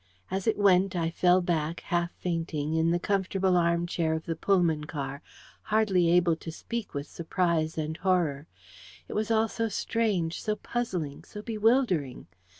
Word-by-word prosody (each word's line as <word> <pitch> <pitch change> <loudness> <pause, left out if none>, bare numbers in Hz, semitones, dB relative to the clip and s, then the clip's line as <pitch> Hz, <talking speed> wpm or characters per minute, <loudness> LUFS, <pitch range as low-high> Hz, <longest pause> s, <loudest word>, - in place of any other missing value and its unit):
As 190 +2 -2
it 225 - +2
went, 195 -1 +4
I 165 -1 0
fell 180 +2 +4
back, 165 -1 -1
half 175 0 0
fainting, 165 -3 -2
in 160 +1 +2
the 170 - +2
comfortable 190 0 +1
armchair 170 -1 +1
of 160 - -5
the 165 - -2
Pullman 165 -4 +2
car, 140 -2 -5 0.4
hardly 205 -5 +2
able 170 -1 +4
to 165 - -7
speak 230 +3 -6
with 140 0 -3
surprise 165 -1 -1
and 155 0 -3
horror. 170 -6 0 0.6
It - - -7
was 215 +1 -1
all 225 0 +3
so 225 +1 -2
strange, 200 -7 -1
so 215 - -1
puzzling, 180 -13 -3
so 210 - -9
bewildering! 215 - +1
175 Hz, 155 wpm, -28 LUFS, 160-200 Hz, 0.6 s, went